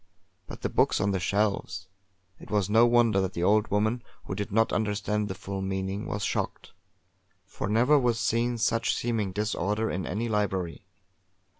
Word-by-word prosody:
But - - -9
the - - 0
books - - +2
on 100 - +1
the 95 - 0
shelves! 100 0 -1 0.5
It - - -13
was 105 -1 0
no 115 +2 +6
wonder 115 -4 +4
that 95 0 -2
the 85 - -2
old 105 +3 +3
woman, 110 +4 0 0.2
who - - -5
did 100 +1 -4
not 110 +2 +2
understand 105 0 0
the 95 - -5
full 95 +1 -5
meaning, 95 +1 -3
was 100 +1 -3
shocked; - - -3 0.7
for - - -5
never 125 +7 +4
was 120 -3 +1
seen 115 +2 +1
such 115 +1 +1
seeming 110 -5 -1
disorder 105 +1 -1
in 90 0 -3
any 110 +6 -2
library. 95 -6 -2
105 Hz, 170 wpm, -27 LUFS, 95-110 Hz, 0.7 s, no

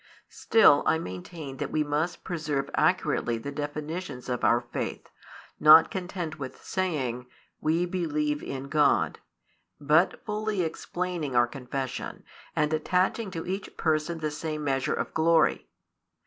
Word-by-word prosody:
Still, 215 -10 +5
I 160 - +4
maintain 135 - -7
that - - -3
we 155 - +1
must 150 +4 -2
preserve 150 -6 -2
accurately 155 -9 +1
the 125 +5 -6
definitions 145 -1 -5
of 125 -1 -2
our 120 - +5
faith, 120 -1 -5 0.5
not 155 +2 +8
content 175 -4 -4
with 130 -2 -7
saying 135 -10 -2 0.3
"We 165 +3 +1
believe 150 -4 -1
in 135 0 -5
God," 150 0 +2 0.6
but 150 +5 +2
fully 210 -3 -1
explaining 170 -3 -3
our 120 0 +6
confession, 130 +1 -5 0.3
and 150 0 +1
attaching 185 +7 +1
to 165 -3 -5
each 190 +2 -5
Person 160 +1 0
the 155 -1 -1
same 155 0 -4
measure 135 -2 0
of - - -4
glory. 165 +1 +3
155 Hz, 135 wpm, -27 LUFS, 140-175 Hz, 0.6 s, not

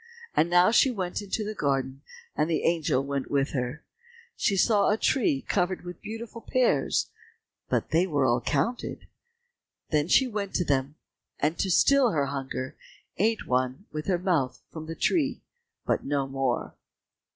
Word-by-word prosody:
And 165 - +3
now 175 +3 +5
she 265 - +5
went 190 -7 -3
into 205 +2 -3
the 215 - -3
garden 135 -5 -1 0.3
and 155 +2 +1
the 165 - 0
angel 160 -6 +1
went 140 -1 -3
with 140 0 +1
her. 125 +2 -3 0.5
She 200 -5 +1
saw 205 +1 +4
a 210 - +2
tree 215 - +1
covered 180 -1 -1
with 175 -1 -8
beautiful 225 +1 -7
pears, 255 +1 +1 0.6
but - - -1
they 170 +4 +3
were 145 -6 +1
all 120 -1 +2
counted. 150 - -2 0.9
Then 150 -1 +2
she 265 - +5
went 205 -4 -4
to 180 - +1
them, 140 0 0 0.4
and 150 +3 +1
to 195 - 0
still 275 +7 +5
her 145 -3 +1
hunger, 135 -1 -4 0.4
ate 220 +4 +1
one 130 +7 -1
with 155 0 -5
her 185 -2 +2
mouth 170 -8 0
from 160 -1 -8
the 165 - -5
tree, 290 - 0 0.4
but - - 0
no 140 -1 0
more. 135 -2 -2
165 Hz, 160 wpm, -27 LUFS, 140-205 Hz, 0.9 s, now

